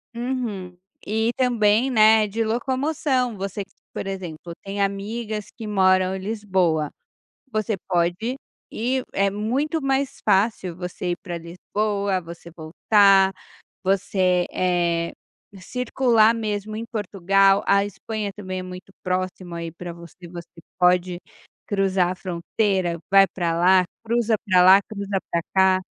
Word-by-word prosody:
Uhum. 230 Hz, -8 st, -4 dB, 0.3 s
E 220 Hz, +2 st, 0 dB
também, 240 Hz, -1 st, +3 dB
né, 215 Hz, -1 st, +5 dB
de 225 Hz, +3 st, -1 dB
locomoção, 260 Hz, +1 st, -1 dB
você 195 Hz, +1 st, -4 dB
que, 195 Hz, -, -24 dB, 0.2 s
por -, -, -5 dB
exemplo, 175 Hz, -3 st, -6 dB
tem 200 Hz, +1 st, -4 dB
amigas 210 Hz, +2 st, -3 dB
que 225 Hz, -3 st, -8 dB
moram 185 Hz, -2 st, +3 dB
em -, -, -5 dB
Lisboa, 190 Hz, -7 st, 0 dB, 0.6 s
você 215 Hz, -1 st, -1 dB
pode 180 Hz, +8 st, 0 dB, 0.3 s
e 255 Hz, +3 st, -1 dB
é 195 Hz, 0 st, +2 dB
muito 260 Hz, +10 st, -1 dB
mais 270 Hz, 0 st, -1 dB
fácil 190 Hz, -3 st, +1 dB
você 180 Hz, 0 st, -4 dB
ir -, -, -3 dB
pra 175 Hz, -3 st, -5 dB
Lisboa, 200 Hz, +3 st, -2 dB
você 170 Hz, 0 st, -11 dB
voltar, 195 Hz, +4 st, +4 dB, 0.5 s
você, 185 Hz, -2 st, +1 dB
eh, 170 Hz, -2 st, 0 dB, 0.5 s
circular 235 Hz, 0 st, +2 dB
mesmo 215 Hz, -1 st, -3 dB
em 230 Hz, -, -4 dB
Portugal, 195 Hz, -2 st, +2 dB
a 200 Hz, 0 st, +4 dB
Espanha 205 Hz, +1 st, -5 dB
também 185 Hz, -2 st, -5 dB
é -, -, -5 dB
muito 185 Hz, +1 st, -10 dB
próxima 185 Hz, -1 st, -3 dB
aí 165 Hz, -1 st, -5 dB
pra 175 Hz, 0 st, -7 dB
você, 170 Hz, +1 st, -13 dB
você 170 Hz, -1 st, -9 dB, 0.3 s
pode 180 Hz, 0 st, +3 dB, 0.5 s
cruzar 195 Hz, -3 st, +1 dB
a -, -, -2 dB
fronteira, 180 Hz, 0 st, -1 dB
vai 195 Hz, 0 st, +7 dB
pra 170 Hz, -3 st, -2 dB
lá, 185 Hz, +1 st, +5 dB, 0.2 s
cruza 230 Hz, -1 st, +1 dB
pra 180 Hz, -1 st, +5 dB
lá, 190 Hz, +2 st, +8 dB
cruza 200 Hz, -2 st, -3 dB
pra 170 Hz, -, +1 dB
cá. 190 Hz, 0 st, +4 dB
195 Hz, 135 wpm, -23 LUFS, 180-220 Hz, 0.6 s, lá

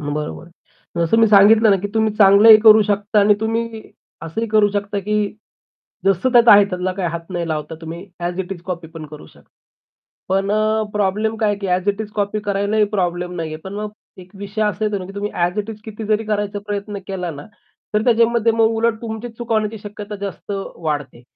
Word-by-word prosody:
बरोबर 150 Hz, +2 st, -4 dB
आहे. 175 Hz, -, -19 dB, 0.5 s
जसं 225 Hz, -, +2 dB
मी 225 Hz, -, +6 dB
सांगितलं 215 Hz, +2 st, +6 dB
ना 195 Hz, -, +5 dB
की 205 Hz, -, -2 dB
तुम्ही 220 Hz, -1 st, +1 dB
चांगलंही 210 Hz, +2 st, +8 dB
करू 220 Hz, -1 st, +7 dB
शकता 205 Hz, +1 st, +1 dB
आणि 205 Hz, +1 st, +5 dB
तुम्ही 225 Hz, 0 st, -2 dB, 0.4 s
असंही 165 Hz, +8 st, -3 dB
करू 210 Hz, -1 st, +4 dB
शकता 205 Hz, 0 st, -2 dB
की 210 Hz, +2 st, -2 dB, 0.9 s
जसं 195 Hz, +6 st, +2 dB
त्यात 240 Hz, -1 st, +5 dB
आहे 205 Hz, -, +7 dB
त्यातला 180 Hz, 0 st, -2 dB
काही 185 Hz, -2 st, -2 dB
हात 170 Hz, 0 st, -4 dB
नाही 170 Hz, -1 st, -3 dB
लावता 155 Hz, 0 st, -4 dB
तुम्ही, 165 Hz, +3 st, -8 dB, 0.2 s
अ‍ॅज 175 Hz, +2 st, -3 dB
इट 190 Hz, +1 st, -5 dB
इज 175 Hz, -3 st, -10 dB
कॉपी 175 Hz, -3 st, -6 dB
पण 160 Hz, -1 st, -9 dB
करू 150 Hz, 0 st, -12 dB
शकता. -, -, -21 dB, 0.8 s
पण 195 Hz, +1 st, 0 dB
अ, 215 Hz, +1 st, +1 dB
प्रॉब्लेम 210 Hz, +2 st, 0 dB
काय 215 Hz, -1 st, +1 dB
आहे 205 Hz, -, -2 dB
की 200 Hz, -, -4 dB
अ‍ॅज 185 Hz, +1 st, 0 dB
इट 205 Hz, +1 st, 0 dB
इज 210 Hz, -, -9 dB
कॉपी 205 Hz, 0 st, -1 dB
करायलाही 205 Hz, +1 st, 0 dB
प्रॉब्लेम 180 Hz, -1 st, -1 dB
नाहीये. 160 Hz, -2 st, -4 dB
पण 190 Hz, +1 st, -7 dB
मग 210 Hz, 0 st, -4 dB, 0.3 s
एक 185 Hz, 0 st, -13 dB
विषय 200 Hz, +2 st, -4 dB
असा 210 Hz, +1 st, -1 dB
येतो 210 Hz, -1 st, -1 dB
ना 185 Hz, -, -7 dB
की 195 Hz, -, -10 dB
तुम्ही 205 Hz, +1 st, -3 dB
अ‍ॅज 175 Hz, +4 st, -1 dB
इट 210 Hz, +2 st, -3 dB
इज 215 Hz, -1 st, -9 dB
किती 220 Hz, 0 st, -7 dB
जरी 215 Hz, +1 st, 0 dB
करायचा 205 Hz, -1 st, -2 dB
प्रयत्न 205 Hz, 0 st, -4 dB
केला 180 Hz, -3 st, -4 dB
ना, 145 Hz, -2 st, -9 dB, 0.5 s
तर 210 Hz, -, +2 dB
त्याच्यामध्ये 230 Hz, -1 st, +3 dB
मग 225 Hz, 0 st, +3 dB
उलट 230 Hz, 0 st, +1 dB
तुमची 225 Hz, +1 st, -5 dB
चुक 240 Hz, -1 st, -4 dB
होण्याची 215 Hz, 0 st, 0 dB
शक्यता 205 Hz, 0 st, -8 dB
जास्त 200 Hz, 0 st, -6 dB, 0.2 s
वाढते. 145 Hz, -6 st, -4 dB
205 Hz, 210 wpm, -19 LUFS, 180-215 Hz, 0.9 s, चांगलंही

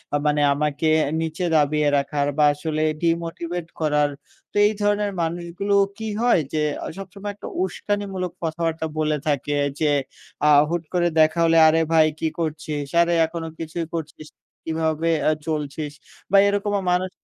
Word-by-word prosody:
আ -, -, +4 dB
মানে 150 Hz, 0 st, +2 dB
আমাকে 150 Hz, +2 st, -1 dB, 0.2 s
এ -, -, -5 dB
নীচে 165 Hz, +2 st, -2 dB
দাবিয়ে 150 Hz, 0 st, +2 dB
রাখার 140 Hz, +1 st, -1 dB
বা 150 Hz, -, +4 dB
আসলে 155 Hz, +1 st, -3 dB, 0.2 s
ডিমোটিভেট 170 Hz, 0 st, -2 dB
করার। 150 Hz, -2 st, +2 dB, 0.4 s
তো -, -, -33 dB
এই 215 Hz, -, 0 dB
ধরনের 205 Hz, 0 st, +1 dB
মানুষগুলো 170 Hz, +4 st, -2 dB, 0.2 s
কী 220 Hz, 0 st, -5 dB
হয় 245 Hz, -6 st, +4 dB
যে, 155 Hz, -, 0 dB, 0.2 s
আ -, -, -4 dB
সবসময় 195 Hz, +1 st, -7 dB
একটা -, -, -9 dB, 0.2 s
উস্কানিমূলক 190 Hz, -1 st, -3 dB
কথাবার্তা 165 Hz, 0 st, -2 dB
বলে 155 Hz, -1 st, +1 dB
থাকে 145 Hz, 0 st, 0 dB, 0.2 s
যে, 150 Hz, -2 st, +2 dB, 0.6 s
আ -, -, +6 dB, 0.2 s
হুট 170 Hz, -1 st, -1 dB
করে 175 Hz, -1 st, +2 dB
দেখা 155 Hz, +2 st, +4 dB
হলে, 165 Hz, 0 st, +4 dB
"আরে, 160 Hz, +1 st, +4 dB
ভাই 155 Hz, -1 st, +6 dB
কী 160 Hz, -, 0 dB
করছিস? 150 Hz, -3 st, -3 dB
আরে 170 Hz, 0 st, +2 dB
এখনো 165 Hz, 0 st, -5 dB
কিছুই 165 Hz, +1 st, -4 dB
করছিস 155 Hz, -2 st, -6 dB, 0.4 s
কীভাবে 160 Hz, 0 st, -1 dB, 0.2 s
আ -, -, +4 dB, 0.2 s
চলছিস?" 150 Hz, -1 st, -3 dB, 0.4 s
বা 200 Hz, -, +6 dB
এরকমও 205 Hz, 0 st, 0 dB
মানুষ 185 Hz, +1 st, 0 dB
165 Hz, 155 wpm, -23 LUFS, 155-175 Hz, 0.6 s, আ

